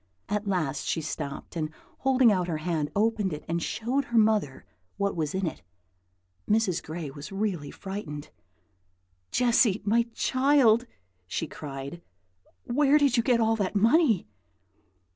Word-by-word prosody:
At 210 Hz, 0 st, -1 dB
last 155 Hz, -8 st, -1 dB
she -, -, 0 dB
stopped, 150 Hz, 0 st, -5 dB
and 155 Hz, -2 st, -2 dB, 0.3 s
holding 260 Hz, -3 st, +4 dB
out 180 Hz, -3 st, +1 dB
her 165 Hz, -3 st, -1 dB
hand, 155 Hz, -2 st, -1 dB
opened 210 Hz, -3 st, +1 dB
it 150 Hz, -, -7 dB
and 170 Hz, +1 st, -1 dB
showed 250 Hz, +10 st, -1 dB
her 235 Hz, -, -1 dB
mother 215 Hz, -11 st, +2 dB, 0.3 s
what 200 Hz, 0 st, 0 dB
was 155 Hz, 0 st, -2 dB
in 190 Hz, 0 st, 0 dB
it. 160 Hz, -, -4 dB, 0.9 s
Mrs. 210 Hz, -5 st, +2 dB
Gray 155 Hz, -3 st, -6 dB
was 145 Hz, +7 st, -9 dB
really 195 Hz, -7 st, -2 dB
frightened. 190 Hz, -7 st, -7 dB, 1.0 s
"Jessy, 235 Hz, -, +3 dB
my 230 Hz, +3 st, +3 dB
child!" 255 Hz, -3 st, +3 dB, 0.4 s
she 125 Hz, -, -2 dB
cried, 140 Hz, +1 st, -7 dB, 0.6 s
"where 285 Hz, +3 st, +3 dB
did 280 Hz, -4 st, +3 dB
you 235 Hz, -, +4 dB
get 240 Hz, 0 st, +2 dB
all 225 Hz, 0 st, +3 dB
that 200 Hz, -1 st, -2 dB
money?" 230 Hz, -, +4 dB
200 Hz, 145 wpm, -27 LUFS, 160-235 Hz, 1.0 s, holding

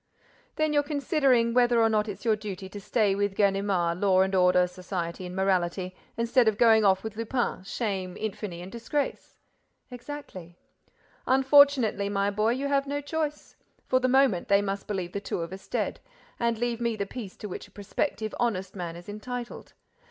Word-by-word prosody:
"Then 310 Hz, -1 st, +1 dB
you're 290 Hz, -, +4 dB
considering 280 Hz, -5 st, +2 dB
whether 240 Hz, -2 st, +4 dB
it's 225 Hz, -, +2 dB
not 210 Hz, 0 st, -1 dB
your 220 Hz, -2 st, +4 dB
duty 200 Hz, -2 st, -7 dB
to 205 Hz, +1 st, -8 dB
stay 205 Hz, -1 st, +1 dB
with 200 Hz, 0 st, -1 dB
Ganimard, 195 Hz, -4 st, +1 dB
law 190 Hz, -2 st, +4 dB
and 190 Hz, 0 st, +1 dB
order, 180 Hz, -1 st, +4 dB
society 180 Hz, -1 st, -5 dB
and 180 Hz, -, -8 dB
morality, 185 Hz, -1 st, 0 dB, 0.2 s
instead 235 Hz, +1 st, +3 dB
of 215 Hz, -2 st, +2 dB
going 225 Hz, -2 st, +5 dB
off 190 Hz, -2 st, +3 dB
with 220 Hz, -1 st, -6 dB
Lupin, 230 Hz, -2 st, -1 dB
shame, 190 Hz, -3 st, -3 dB
infamy 200 Hz, -4 st, -5 dB
and 185 Hz, -, -9 dB
disgrace." 275 Hz, +5 st, -3 dB, 0.5 s
"Exactly." 245 Hz, -, -9 dB, 0.7 s
"Unfortunately, 265 Hz, -6 st, +4 dB
my 200 Hz, 0 st, 0 dB
boy, 215 Hz, +3 st, +1 dB
you 275 Hz, +3 st, -2 dB
have 280 Hz, 0 st, +1 dB
no 285 Hz, +1 st, -2 dB
choice. 300 Hz, +1 st, -4 dB, 0.3 s
For 255 Hz, -, +2 dB
the 255 Hz, -, +1 dB
moment, 260 Hz, -8 st, +3 dB
they 200 Hz, 0 st, +4 dB
must 195 Hz, 0 st, -3 dB
believe 190 Hz, -4 st, -3 dB
the 200 Hz, -, -4 dB
two 185 Hz, -, -3 dB
of 165 Hz, +2 st, -5 dB
us 190 Hz, -, -10 dB
dead—and 235 Hz, -, -3 dB
leave 240 Hz, 0 st, -2 dB
me 235 Hz, -1 st, 0 dB
the 200 Hz, -2 st, -2 dB
peace 205 Hz, -2 st, -8 dB
to 210 Hz, -, -6 dB
which 185 Hz, -, -7 dB
a -, -, -24 dB
prospective 215 Hz, +2 st, -3 dB
honest 195 Hz, -6 st, -1 dB
man 175 Hz, -3 st, -5 dB
is 175 Hz, +1 st, -11 dB
entitled. 240 Hz, +4 st, -7 dB
210 Hz, 175 wpm, -27 LUFS, 190-245 Hz, 0.7 s, going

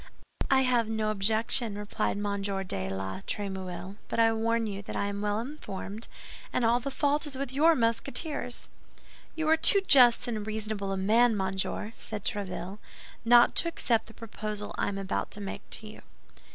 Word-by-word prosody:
"I 270 Hz, -1 st, +5 dB
have 245 Hz, -4 st, +2 dB
no 220 Hz, -1 st, 0 dB
objection," 220 Hz, +1 st, +3 dB
replied 205 Hz, 0 st, -2 dB
M. 205 Hz, -1 st, -2 dB
de 195 Hz, -, -3 dB
la 95 Hz, 0 st, -4 dB
Trémouille, 190 Hz, -1 st, -5 dB
"but -, -, -4 dB
I 225 Hz, 0 st, +5 dB
warn 230 Hz, +1 st, 0 dB
you 200 Hz, -2 st, -4 dB
that -, -, -8 dB
I -, -, 0 dB
am 200 Hz, 0 st, -3 dB
well 210 Hz, 0 st, 0 dB
informed, 225 Hz, -5 st, -7 dB, 0.4 s
and 240 Hz, -, +1 dB
all 235 Hz, +2 st, +3 dB
the 265 Hz, -, -4 dB
fault 290 Hz, +2 st, 0 dB
is 280 Hz, -, -2 dB
with 275 Hz, -2 st, -3 dB
your 320 Hz, +4 st, +5 dB
Musketeers." 245 Hz, +3 st, -1 dB, 0.7 s
"You 320 Hz, -1 st, -2 dB
are 320 Hz, +1 st, +5 dB
too 395 Hz, +5 st, +5 dB
just 250 Hz, -5 st, +7 dB
and 215 Hz, -3 st, -3 dB
reasonable 215 Hz, -2 st, -3 dB
a 195 Hz, -, -1 dB
man, 220 Hz, +4 st, +3 dB
monsieur!" 190 Hz, +2 st, -2 dB
said 215 Hz, -2 st, -5 dB
Tréville, 200 Hz, -1 st, -3 dB, 0.4 s
"not 240 Hz, +1 st, +6 dB
to -, -, +5 dB
accept 245 Hz, -8 st, 0 dB
the 225 Hz, -, -14 dB
proposal 215 Hz, -2 st, -6 dB
I -, -, -1 dB
am 200 Hz, -, -3 dB
about 195 Hz, 0 st, -2 dB
to 210 Hz, -, -7 dB
make 200 Hz, -1 st, -6 dB
to 220 Hz, -, -4 dB
you." 215 Hz, -, -11 dB
215 Hz, 180 wpm, -28 LUFS, 200-240 Hz, 0.7 s, just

